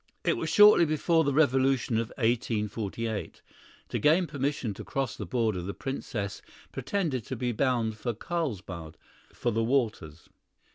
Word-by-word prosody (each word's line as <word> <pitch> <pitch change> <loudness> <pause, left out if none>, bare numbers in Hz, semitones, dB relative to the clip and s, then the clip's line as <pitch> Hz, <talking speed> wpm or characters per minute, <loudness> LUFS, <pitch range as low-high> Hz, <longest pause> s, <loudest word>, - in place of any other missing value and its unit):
It - - +2
was - - -3
shortly 210 -4 +7
before 160 +2 +2
the 140 - +1
revolution 135 -4 +2
of 115 - -1
1848. 110 -2 -2 0.5
To - - -2
gain 160 +5 +4
permission 140 -7 -2
to - - -8
cross 135 -4 -2
the 105 - -6
border, 110 -4 0
the 95 +3 -5
Princess 105 -7 -4 0.3
pretended 135 - -2
to 130 - -3
be 125 0 -1
bound 115 -3 0
for 120 -1 -2
Carlsbad, 100 - -4 0.3
for 120 - -2
the 115 +1 0
waters. 115 - -1
120 Hz, 145 wpm, -28 LUFS, 105-140 Hz, 0.5 s, shortly